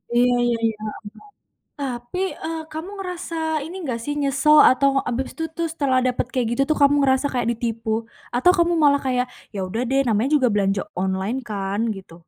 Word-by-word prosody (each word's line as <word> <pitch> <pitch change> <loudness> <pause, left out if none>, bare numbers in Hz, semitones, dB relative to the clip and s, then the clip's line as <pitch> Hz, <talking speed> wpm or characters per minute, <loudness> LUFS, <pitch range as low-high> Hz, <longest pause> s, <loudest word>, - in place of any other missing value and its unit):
Iya 245 +1 +4
iya 235 -1 +1
iya, 220 -1 0
heeh 215 - -3 0.7
heeh. - - -56
Tapi, 250 +4 -4 0.3
eee, 325 0 -3
kamu 320 +5 -6
ngerasa 360 -3 -5 0.3
ini 340 - -8
gak 235 - -2
sih, 290 - -2
nyesel 280 +2 +4
atau 275 +2 +3 0.2
abis 255 +2 -2
itu 325 - -4
tuh 335 0 0
setelah 270 -5 +1
dapet 250 -1 0
kayak 250 -4 0
gitu 240 - 0
tuh 310 - +2
kamu 285 +1 +6
ngerasa 265 0 +2
kayak 245 -3 0
ditipu, 230 -1 -3 0.5
atau 305 +9 +5
kamu 345 0 +3
malah 285 -1 +4
kayak 250 -1 +1 0.3
ya 195 - -3
udah 225 +6 -3
deh 270 +1 +2
namanya 225 +4 +1
juga 260 -4 +3
belanja 195 -1 +1 0.2
online 190 +6 -1
kan, 200 0 -2 0.2
gitu? 190 -3 -12
255 Hz, 190 wpm, -22 LUFS, 225-290 Hz, 0.7 s, kamu